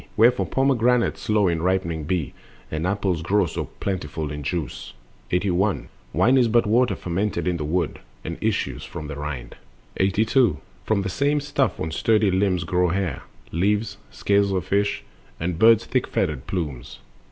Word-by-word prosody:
Wherefore 120 +3 +4
pomegranates 125 -3 +2
slow 105 -3 +2
in 85 -2 0
ripening 85 -4 0
be, 85 -2 -1 0.4
And 80 +3 -1
apples 95 -4 0
grow 95 +4 +2
so 80 - -4
plentiful 80 -6 -3
in 75 0 -5
juice. 80 +2 -4 0.4
81. 90 - 0 0.2
Wine 130 - +4
is 120 - +4
but 115 +1 +3
water 120 +4 +3
fermented 95 +3 -2
in 90 -1 +1
the 75 - -3
wood, 80 +1 -1 0.3
And 85 0 -5
issues 110 -1 -1
from 85 -3 -7
the 70 - -5
rind 70 -5 -6 0.4
82. 110 - +3 0.3
From 105 -3 +1
the - - -2
same 145 +8 +1
stuff 145 -2 0
on 80 - -3
sturdy 105 +3 +2
limbs 95 -1 +1
grow 90 0 +1
hair, 90 -4 -1 0.3
Leaves, 105 +4 0
scales 100 0 +1
of 95 -2 -1
fish, 100 -3 0 0.4
and 85 0 -2
bird's 115 -1 +6
thick - - 0
feathered 65 - -2
plumes. 75 -10 -4
95 Hz, 160 wpm, -23 LUFS, 85-110 Hz, 0.4 s, bird's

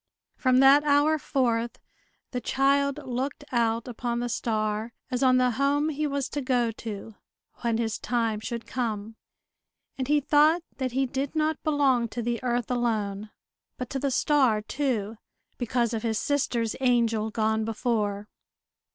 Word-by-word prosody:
From 255 -1 +2
that 275 +2 +7
hour 295 +2 +3
forth, 240 -4 0 0.5
the 250 - -3
child 275 +2 +2
looked 260 +3 -3
out 230 -1 +1
upon 240 0 -3
the 240 0 -2
star 215 0 -1 0.2
as 250 0 -1
on 255 -1 +5
the 250 -1 +3
home 280 +4 +1
he 305 0 -1
was 280 -2 -2
to 290 - -3
go 250 -3 +1
to, 220 -1 -7 0.4
when 235 -2 0
his 225 -2 -2
time 230 -3 0
should 235 +1 -5
come; 225 -3 -3 0.8
and 260 - -1
he 295 +1 +4
thought 305 +4 +4
that 255 -2 -2
he 270 +1 +2
did 270 +3 -3
not 310 0 0
belong 275 -6 +2
to 235 +2 -5
the 235 0 -2
earth 245 -1 -1
alone, 215 -4 -1 0.5
but 250 -1 -6
to 270 - -2
the 280 - 0
star 260 -4 +3
too, 225 -5 -2 0.4
because 240 -1 0
of 225 - -2
his 225 -1 -1
sister's 240 -5 0
angel 230 -4 +2
gone 220 0 0
before. 210 -2 -1
245 Hz, 155 wpm, -27 LUFS, 225-275 Hz, 0.8 s, that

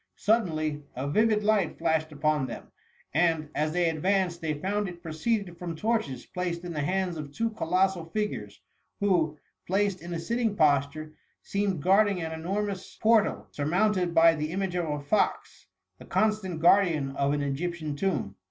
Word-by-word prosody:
Suddenly, 155 -9 +1
a 130 +3 -3
vivid 215 +7 +2
light 205 -5 +2
flashed 160 -1 0
upon 150 -2 0
them, - - -8 0.4
and, 160 -1 +2
as 155 +1 0
they 175 +1 +2
advanced, 175 +2 0
they 155 -2 -1
found 200 +5 -1
it 175 0 -11
proceeded 175 +2 -2
from 170 -2 -4
torches 210 - -1
placed 175 -1 -3
in 175 -1 -5
the 150 - -2
hands 180 +2 -1
of 145 -2 -6
two 230 +9 -1
colossal 185 -3 +1
figures, 210 +5 -4 0.4
who, 170 -7 +1 0.3
placed 195 0 +1
in 170 +1 -8
a 170 - -2
sitting 225 +5 -1
posture, 155 -1 +1 0.3
seemed 195 -6 -1
guarding 200 0 +4
an 160 -1 -4
enormous 190 +4 -3
portal, 220 -1 +2
surmounted 180 +3 +1
by 165 0 +7
the 155 -1 -3
image 190 0 -2
of 175 -3 -1
a 150 0 -2
fox, 145 +9 -1 0.3
the - - -12
constant 210 -6 0
guardian 165 -6 +3
of 140 0 +1
an 145 0 0
Egyptian 155 +2 -3
tomb. 145 - -1
170 Hz, 160 wpm, -28 LUFS, 155-195 Hz, 0.4 s, by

